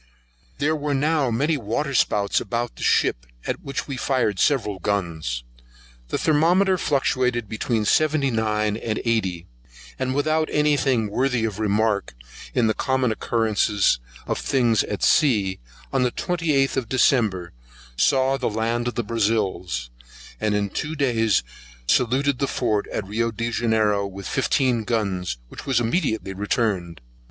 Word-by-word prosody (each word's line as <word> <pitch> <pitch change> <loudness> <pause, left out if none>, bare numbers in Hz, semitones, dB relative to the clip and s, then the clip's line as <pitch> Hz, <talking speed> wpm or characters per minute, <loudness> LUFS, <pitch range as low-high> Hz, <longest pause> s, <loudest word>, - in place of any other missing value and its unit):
There 155 +2 +1
were 145 -1 -1
now 150 -1 +1
many 145 +7 +1
water 135 +5 -2
spouts 105 -5 +2
about 120 0 -3
the - - -12
ship, - - +1 0.2
at - - -3
which 140 -1 -4
we 135 -2 -4
fired 120 -7 0
several 110 -9 +1
guns: 85 -11 -2 0.6
the - - -2
thermometer 175 +5 +3
fluctuated 125 -5 0
between 110 +1 -1
seventy 155 +1 +2
nine 110 -2 0
and 110 -1 -3
eighty, 95 -7 0 0.5
and 130 0 -1
without 155 +2 +1
any 150 0 +3
thing 125 -7 +1
worthy 125 0 +1
of 110 -2 -4
remark, 105 - 0 0.4
in 125 - +3
the 110 - +2
common 130 0 0
occurrence 110 - +1 0.3
of - - -2
things 120 -6 +2
at 105 - -4
sea, 105 -10 +3 0.3
on - - +2
the 125 - +3
twenty 165 +4 -2
eight 135 -1 +2
of 125 -5 -2
December 110 -9 +2 0.4
saw 135 - +2
the 130 - -1
land 115 +2 -1
of 120 - -3
the 120 - -1
Brazils, 100 - -1 0.5
and 105 -1 0
in 100 -1 -1
two 155 +2 -3
days 115 - +2 0.4
saluted 130 - +2
the 140 - +1
fort 110 -6 0
at 105 - -4
Rio 115 +4 -1
Janiero 110 -3 0
with 100 0 -8
fifteen 130 -3 +1
guns, 95 - -1
which - - -10
was 130 -3 +3
immediately 115 - -1
returned. 95 - -1
115 Hz, 145 wpm, -23 LUFS, 105-135 Hz, 0.6 s, thermometer